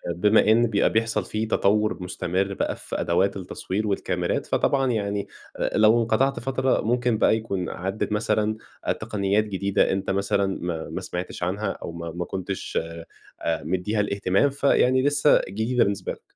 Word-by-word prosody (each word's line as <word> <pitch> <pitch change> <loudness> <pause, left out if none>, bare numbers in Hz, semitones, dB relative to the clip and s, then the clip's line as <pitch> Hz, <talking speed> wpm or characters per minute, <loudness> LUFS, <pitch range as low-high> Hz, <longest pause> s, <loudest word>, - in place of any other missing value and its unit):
بما 105 +3 +4
إن 120 +2 +4
بيبقى 105 -2 +2
بيحصل 110 -3 0
في 110 +4 -2
تطوُّر 105 0 +2
مستمر 95 +2 -2
بقى - - -2
في - - -5
أدوات 95 +4 +1
التصوير 95 +3 -4
والكاميرات، 100 - -1
فطبعًا 135 -2 +1
يعني 100 -3 -2 0.3
أ - - -1
لو 110 +2 +5
انقطعت 125 +5 +1
فترة 130 +1 0
ممكن 120 0 +1
بقى 110 - +4
يكون 100 -5 -3
عدّت 95 +4 -3
مثلًا 105 0 0 0.3
أ - - 0
تقنيات 100 +1 0
جديدة 100 -1 0
أنت 95 0 -2
مثلًا 100 0 0
ما 85 -2 -4
ما - - -4
سمعتش 90 0 -5
عنها 100 +4 -1
أو - - -7
ما 85 0 -6
ما 85 +1 -4
كنتش 95 +1 -4 0.6
أ 80 -1 -1
مدّيها 95 +6 -1
الاهتمام، 100 +5 +2
فيعني 130 -2 +3
لسّه 145 +1 +4
جديدة 115 +5 +1
بالنسبة 100 -2 -2
لك. - - -9
105 Hz, 160 wpm, -24 LUFS, 95-110 Hz, 0.6 s, لو